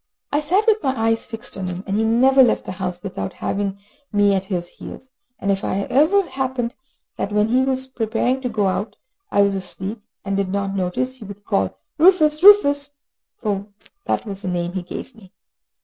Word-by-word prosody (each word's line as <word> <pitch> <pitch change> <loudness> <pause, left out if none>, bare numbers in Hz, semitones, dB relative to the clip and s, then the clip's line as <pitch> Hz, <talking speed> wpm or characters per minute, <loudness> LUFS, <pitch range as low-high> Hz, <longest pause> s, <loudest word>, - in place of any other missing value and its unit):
I 290 - +1
sat 370 +8 +2
with 440 -1 +3
my 265 -3 -1
eyes 225 0 +1
fixed 225 +1 -5
on 190 -1 -4
him, 180 +1 -5
and 195 - -2
he 220 - +2
never 255 +4 +5
left 245 - +3
the - - -5
house 180 -1 -5
without 100 - -4
having 200 0 -2 0.3
me 205 -2 +3
at 190 -1 0
his 180 -3 -3
heels; 260 +7 -11 0.3
and 200 - -1
if 195 0 -1
it 195 +1 -2
ever 340 +8 +4
happened 260 -4 -2 0.4
that 200 - -2
when 210 +1 +2
he 255 +2 +3
was 260 0 0
preparing 245 +1 -1
to 250 - -2
go 215 -3 0
out 195 +3 -1 0.3
I 200 - +4
was 200 0 +2
asleep, 190 +3 -4 0.2
and 195 0 -1
did 195 -1 0
not 195 0 -2
notice, 200 +8 -2
he 220 - -10
would 200 0 -11
call 95 -1 0 0.2
"Rufus, 310 -3 +5
Rufus," 290 -8 +6 0.5
for 200 -2 -2 0.4
that - - -1
was 200 -2 -6
the - - -5
name 175 -1 -2
he 190 - -2
gave 180 +8 -8
me. 205 -5 -18
210 Hz, 200 wpm, -21 LUFS, 195-260 Hz, 0.5 s, Rufus